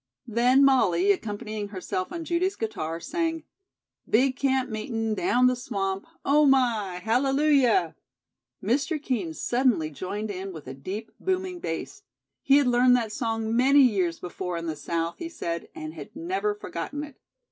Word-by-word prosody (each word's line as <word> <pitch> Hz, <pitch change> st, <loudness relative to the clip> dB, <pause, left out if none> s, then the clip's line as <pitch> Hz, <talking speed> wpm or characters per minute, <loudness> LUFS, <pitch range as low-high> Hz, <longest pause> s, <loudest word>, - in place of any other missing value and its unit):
Then 250 Hz, +4 st, +4 dB
Molly, 200 Hz, -8 st, +4 dB
accompanying 210 Hz, +1 st, -3 dB
herself 185 Hz, -2 st, -4 dB
on 335 Hz, -1 st, -5 dB
Judy's 355 Hz, +3 st, 0 dB
guitar, 165 Hz, -7 st, -3 dB
sang: 325 Hz, -, -2 dB, 0.7 s
"Big 255 Hz, +4 st, +3 dB
camp 265 Hz, -1 st, +1 dB
meetin' 225 Hz, 0 st, -2 dB
down 250 Hz, -, +2 dB
the 250 Hz, 0 st, +4 dB
swamp, 195 Hz, -5 st, -3 dB, 0.2 s
Oh, 295 Hz, +2 st, +5 dB
my! 235 Hz, -8 st, +2 dB
Hallelujah!" 270 Hz, -, +3 dB, 0.7 s
Mr. 290 Hz, +6 st, 0 dB
Kean 235 Hz, -, -2 dB
suddenly 240 Hz, -11 st, +1 dB
joined 205 Hz, +8 st, -4 dB
in 190 Hz, 0 st, -6 dB
with 155 Hz, -4 st, -10 dB
a 130 Hz, -, -7 dB
deep, 190 Hz, +11 st, -6 dB
booming 370 Hz, -1 st, -2 dB
bass. 335 Hz, -, -5 dB, 0.4 s
He 275 Hz, -, +5 dB
had 290 Hz, -, +4 dB
learned 250 Hz, 0 st, +5 dB
that 230 Hz, -3 st, -1 dB
song 225 Hz, 0 st, -2 dB
many 275 Hz, +3 st, +6 dB
years 190 Hz, -9 st, +1 dB
before 180 Hz, 0 st, -4 dB
in 170 Hz, -, -5 dB
the 160 Hz, -2 st, -3 dB
south, 165 Hz, +2 st, -3 dB
he 335 Hz, -, -5 dB
said, 170 Hz, -, -4 dB
and 155 Hz, 0 st, -6 dB
had 155 Hz, -, -10 dB
never 380 Hz, +6 st, -1 dB
forgotten 295 Hz, -7 st, -5 dB
it. 290 Hz, -3 st, -11 dB
235 Hz, 155 wpm, -26 LUFS, 190-275 Hz, 0.7 s, many